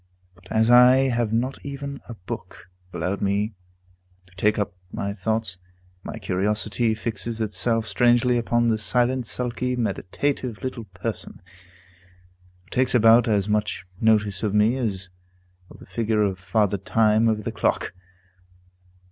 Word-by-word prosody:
But 90 +1 -19
as 110 +2 +3
I 125 +2 +7
have 120 -3 0
not 125 +4 -1
even 140 0 -6
a 120 - -6
book 90 -1 -9 0.2
allowed 90 +4 -3
me 100 +2 0 0.7
to 90 0 -24
take 105 +4 +2
up 105 -1 -1 0.2
my 100 0 -3
thoughts, 110 -2 -2 0.4
my - - -6
curiosity 105 +4 0
fixes 115 0 -4
itself 110 +2 0
strangely 120 +2 +3
upon 120 0 +1
this 110 -1 0
silent, 125 +1 +1
sulky, 125 +1 -2
meditative 120 +2 -2
little 125 -3 -4
person, 95 +3 -6 1.2
who 90 - -28
takes 130 0 +1
about 115 0 +6
as 105 -3 +1
much 105 -3 -1
notice 105 -3 +2
of 105 -2 -1
me 105 +4 +4
as 95 -8 -3 0.6
of - - -14
the - - -14
figure 110 -2 0
of 95 -3 -1
Father 100 +2 0
Time 110 +3 +3
over 110 -1 -1
the - - -3
clock. - - -1
110 Hz, 140 wpm, -24 LUFS, 100-120 Hz, 1.2 s, I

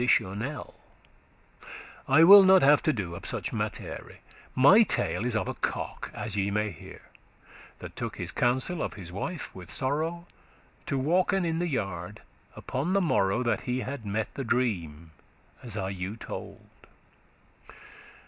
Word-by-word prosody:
not 100 +3 -6
at 140 +6 -3
all* 130 - -9 1.3
I 145 +5 +6
will 200 +4 +11
not 190 -2 +6
have 145 +1 +6
to 155 - +2
do 95 - -4
of 95 - -8
such - - -4
mattere; - - -5 0.4
My 145 - +7
tale 125 - +1
is 120 - -2
of 110 - -1
a - - -2
cock, - - -4
as 105 - -4
ye 100 -1 0
may 105 +1 -1
hear, - - -13 0.7
That - - -10
took - - -5
his - - -5
counsel 130 +7 0
of - - -3
his 90 -4 -9
wife, 145 - -5
with 90 -3 -11
sorrow, 160 +6 -2 0.6
To 140 - -1
walken 175 +6 +1
in 165 0 -1
the 175 - 0
yard 95 - -4 0.3
upon 145 +9 -3
the 200 - +4
morrow 100 - +1
That 120 - 0
he 125 +1 -2
had 130 -2 -5
mette 105 +1 -3
the 135 - -4
dream, 85 - -2 0.5
as 115 -4 -6
I 95 -2 -2
you 95 +2 -5
told. - - -7
125 Hz, 160 wpm, -28 LUFS, 100-155 Hz, 1.3 s, will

